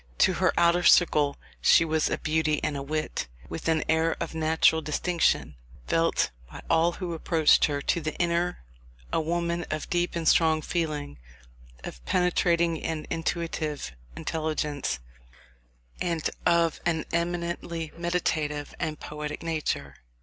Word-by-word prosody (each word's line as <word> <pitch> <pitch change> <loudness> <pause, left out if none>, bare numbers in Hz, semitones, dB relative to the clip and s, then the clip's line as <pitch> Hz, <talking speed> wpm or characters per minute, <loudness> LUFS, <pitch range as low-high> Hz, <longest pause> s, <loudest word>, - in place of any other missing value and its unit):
To - - +4
her - - +2
outer 170 +1 +4
circle 150 -5 +4 0.2
she 165 - +6
was 155 -1 +1
a - - 0
beauty 155 -1 +1
and 150 - -1
a 140 - -3
wit, 155 - -3 0.2
with 80 - -5
an 160 -1 +2
air 160 +1 +2
of - - -4
natural 160 0 +3
distinction, 155 - +1 0.3
felt 165 0 +1 0.2
by - - -10
all 165 +1 +4
who 180 -2 -4
approached 160 -1 +4
her: 145 -1 -2
to 170 - +1
the 155 0 -3
inner, 175 - 0 0.5
a - - +2
woman 170 +1 -1
of 155 -1 -4
deep 175 0 0
and 165 -1 -2
strong 160 -1 +4
feeling, 150 - -3 0.6
of - - -8
penetrating 170 - +2
and 160 -2 -3
intuitive 165 - -2 0.2
intelligence, 150 - -2 1.0
and 165 -3 -1 0.2
of 170 -2 +3
an 165 -2 0
eminently 170 -1 -2
meditative 160 -4 -1
and 155 -3 -3
poetic 150 +1 -6
nature. 160 -2 -2
160 Hz, 135 wpm, -27 LUFS, 155-170 Hz, 1.0 s, she